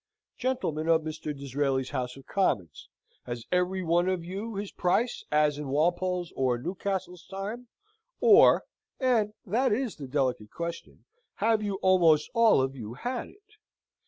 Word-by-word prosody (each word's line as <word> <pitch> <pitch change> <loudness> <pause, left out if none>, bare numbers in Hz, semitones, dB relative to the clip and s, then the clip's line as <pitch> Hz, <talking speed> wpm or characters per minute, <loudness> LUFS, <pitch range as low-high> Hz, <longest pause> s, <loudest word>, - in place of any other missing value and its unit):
Gentlemen 165 - -2
of 165 -1 +4
Mr. 155 0 -7
Disraeli's 135 -1 -2
House 125 -2 -3
of 135 - -14
Commons! 100 - -1 0.4
has 120 -1 -5
every 180 +1 +1
one 175 +2 +2
of 180 -3 -2
you 200 +5 -5
his 200 0 -4
price, 220 +7 0
as 150 -1 +2
in 150 - -5
Walpole's 175 +5 0
or 130 -2 +1
Newcastle's 180 +4 -4
time, 205 +6 -6 0.5
or 450 -4 +7 0.4
(and 225 -5 +2
that 240 +7 +1
is 240 +1 -1
the 140 -3 -7
delicate 130 -6 -1
question) 170 +6 -7 0.3
have 220 +1 +2
you 205 -2 -2
almost 170 -5 +4
all 230 - +5
of 135 +1 -3
you 115 -2 -7
had 245 - -4
it? 415 +1 -22
175 Hz, 150 wpm, -28 LUFS, 145-210 Hz, 0.5 s, or